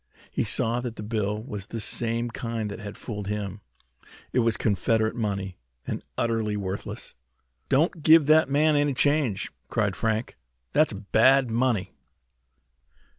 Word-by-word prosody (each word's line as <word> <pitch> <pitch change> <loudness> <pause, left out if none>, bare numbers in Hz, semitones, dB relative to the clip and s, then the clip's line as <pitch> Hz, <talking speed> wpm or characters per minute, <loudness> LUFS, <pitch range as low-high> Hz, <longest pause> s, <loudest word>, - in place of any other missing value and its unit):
He - - 0
saw 115 +2 +2
that 120 -2 -5
the 105 - -7
bill 105 -1 -2
was 105 -6 -6
the 115 - -5
same 115 +2 -1
kind 115 -3 -3
that 100 - -7
had 105 -1 -8
fooled 105 -4 -6
him. 105 -1 -4 0.7
It 125 - +3
was 115 -2 +2
Confederate 110 +2 +1
money, 100 -5 -3 0.3
and - - -3 0.2
utterly 110 -3 0
worthless. 100 0 -5 0.6
"Don't 155 +4 +2
give 155 0 +7
that 155 -1 +5
man 150 +2 +3
any 145 -2 +2
change!" 145 -7 +1 0.2
cried 100 -4 0
Frank. 110 +3 -1 0.3
"That's 155 0 +3
bad 115 +5 +3
money!" 115 -5 +1
115 Hz, 140 wpm, -26 LUFS, 105-130 Hz, 0.7 s, give